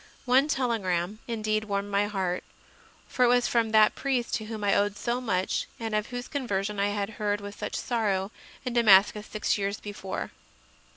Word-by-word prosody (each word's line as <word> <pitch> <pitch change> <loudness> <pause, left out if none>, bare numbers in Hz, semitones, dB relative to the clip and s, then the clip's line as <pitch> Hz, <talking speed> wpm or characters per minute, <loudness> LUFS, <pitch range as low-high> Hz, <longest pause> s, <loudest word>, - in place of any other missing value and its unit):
One 260 +3 +4
telegram 215 - -1
indeed 215 -2 -1
warmed 200 -1 -2
my 200 +1 +2
heart; 190 -3 -2 0.6
for 250 - +1
it - - +6
was 245 0 +4
from 230 -2 +1
that 215 -1 +5
priest 260 -3 -1
to 220 - -1
whom 215 -1 -6
I 200 - +3
owed 205 0 +1
so 240 +3 -1
much 190 -6 -1
and 225 -2 -4
of 210 0 0
whose 245 0 -5
conversion 210 -7 -2
I 200 - +2
had 205 0 -2
heard 205 0 +1
with 205 0 -9
such - - -4
sorrow 205 -5 -1 0.3
in 250 - -2
Damascus 210 -2 +5
six 215 0 -1
years 200 +1 -2
before. 200 -2 -5
210 Hz, 180 wpm, -27 LUFS, 200-235 Hz, 0.6 s, it